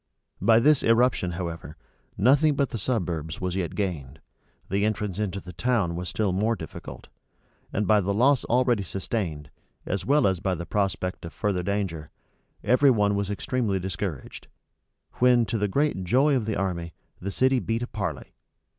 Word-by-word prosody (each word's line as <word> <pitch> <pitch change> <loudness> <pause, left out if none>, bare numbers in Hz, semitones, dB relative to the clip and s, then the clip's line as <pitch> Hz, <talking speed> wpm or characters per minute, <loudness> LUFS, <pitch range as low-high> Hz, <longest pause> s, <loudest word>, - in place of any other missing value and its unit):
By 115 0 +5
this 145 +3 +4
irruption, 115 -6 +2
however, 85 -4 -6 0.4
nothing 140 - +4
but 140 -1 0
the 115 - -4
suburbs 85 - -2
was 90 -1 -2
yet 90 -4 -2
gained: 80 -8 -3 0.5
the 100 +2 0
entrance 105 -2 -1
into 100 -2 -2
the 90 -1 -10
town 90 -2 0
was 90 +1 -4
still 105 -3 0
more 110 +5 +1
difficult: 80 -8 -9 0.6
and 105 - -1
by 105 0 +4
the 100 +1 -1
loss 125 +6 +3
already 120 -2 +2
sustained, 85 - -4 0.3
as 95 - -2
well 145 +2 +3
as 95 -3 +2
by 95 0 -1
the 85 +1 -6
prospect 95 0 -2
of 85 - -8
further 100 -4 -1
danger, 90 -5 -3 0.5
every 130 +3 +4
one 105 -4 +3
was 100 -1 -1
extremely 105 0 -1
discouraged; 95 -4 -5 0.7
when, 125 -1 +5
to 115 - -2
the 105 - +1
great 140 -2 0
joy 135 +10 +3
of 115 -5 -1
the 110 - -1
army, 85 -4 -3 0.3
the 95 - -3
city 130 +5 +2
beat 115 0 -2
a - - -4
parley. - - -5
100 Hz, 170 wpm, -26 LUFS, 90-120 Hz, 0.7 s, By